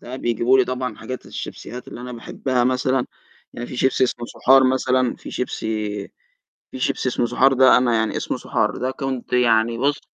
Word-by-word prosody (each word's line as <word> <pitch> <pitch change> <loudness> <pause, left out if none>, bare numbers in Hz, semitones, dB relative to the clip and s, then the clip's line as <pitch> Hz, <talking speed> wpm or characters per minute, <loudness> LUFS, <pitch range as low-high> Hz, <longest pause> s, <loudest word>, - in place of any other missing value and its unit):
ساعات 125 +2 -8
بيجيبوا 120 +3 +2
لي 130 - +5
طبعًا 125 -4 -4
حاجات 130 +3 -7
الشيبسيات 125 +1 -8
اللي - - -9
أنا 125 0 -7
باحبها 125 +1 -2
مثلًا، 130 0 +1 0.5
يعني 120 - -6
فيه 125 - -8
شيبسي 130 0 +2
اسمه 120 -1 -3
صُحار 135 0 +4
مثلًا، 130 -1 +1
في - - -10
شيبسي 125 - -4 1.0
في 130 - -8
شيبسي 130 - 0
اسمه 120 -1 0
صُحار 135 +3 +3
ده 130 0 +6
أنا 120 -2 +2
يعني 110 -1 0
اسمه - - -2
صُحار. - - -1
ده 130 +1 -2
كنت 130 -2 -5
يعني 115 -1 +3
بُصّ، 140 +2 +1
125 Hz, 185 wpm, -21 LUFS, 120-130 Hz, 1.0 s, ده